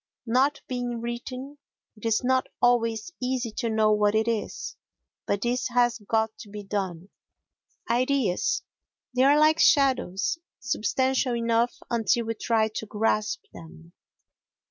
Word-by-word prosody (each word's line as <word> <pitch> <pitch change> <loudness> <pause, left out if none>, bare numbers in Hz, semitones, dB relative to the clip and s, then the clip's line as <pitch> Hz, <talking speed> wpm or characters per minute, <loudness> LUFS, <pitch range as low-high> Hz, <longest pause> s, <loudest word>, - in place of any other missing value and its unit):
Not 265 +6 +2
being 245 -2 -3
written, 255 +4 -6 0.4
it 215 +1 -5
is 225 +1 +1
not 260 +1 +2
always 230 +2 +2
easy 250 -2 -1
to 230 - -1
know 220 -1 +3
what 210 0 +3
it 220 +1 +2
is, 225 -3 -3 0.5
but 200 0 0
this 245 +2 0
has 240 -1 +2
got 220 +1 0
to 210 - -10
be 205 0 -7
done. 190 -3 -4 0.8
Ideas 255 - +1 0.5
They 250 - +3
are 280 +2 +6
like 310 +1 +4
shadows—substantial 260 - +1
enough 230 +1 +1 0.2
until 235 0 +1
we 225 - -1
try 220 0 +1
to 220 0 -6
grasp 215 0 0
them. 80 -1 -13
235 Hz, 130 wpm, -26 LUFS, 215-255 Hz, 0.8 s, are